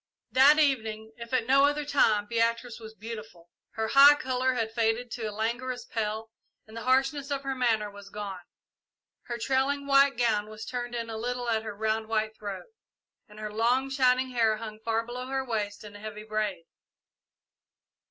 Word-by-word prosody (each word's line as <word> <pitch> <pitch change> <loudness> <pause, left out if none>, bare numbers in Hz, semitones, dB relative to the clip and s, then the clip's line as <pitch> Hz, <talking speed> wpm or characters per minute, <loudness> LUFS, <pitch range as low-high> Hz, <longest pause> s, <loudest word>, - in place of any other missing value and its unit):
That 280 +4 +7
evening, 220 -7 0
if 235 -1 -9
at 255 -3 +1
no 275 +3 +5
other 290 +1 0
time, 220 -8 +3
Beatrice 230 +1 -1
was 220 -1 -11
beautiful. 215 -6 -9 0.2
Her 220 0 -2
high 280 +3 +9
colour 260 -2 0
had 225 -2 -2
faded 230 +1 0
to 225 -3 -3
a - - -6
languorous 235 +4 -3
paleness, 220 0 -3 0.4
and 220 - -14
the 230 - -5
harshness 270 +3 +1
of 280 -1 -2
her 270 -1 -2
manner 225 -5 +1
was 200 0 -12
gone. 200 -3 -6 0.8
Her 240 - -4
trailing 270 +3 0
white 275 -1 +4
gown 215 -3 +1
was 215 0 -8
turned 245 -1 -4
in 230 -1 -4
a 220 - -4
little 245 +2 -3
at 220 -1 +1
her 215 -2 -7
round, 220 +1 -1
white 220 0 -1
throat, 205 -3 -6 0.6
and 210 0 -13
her 215 -1 -5
long, 250 +5 +1
shining 255 -1 +2
hair 225 -3 +2
hung 215 -1 -8
far 225 0 0
below 250 +2 -6
her 265 0 -2
waist 210 -4 -3
in 205 -1 -11
a - - -10
heavy 210 0 -7
braid. 215 -5 -2
230 Hz, 180 wpm, -28 LUFS, 215-255 Hz, 0.8 s, high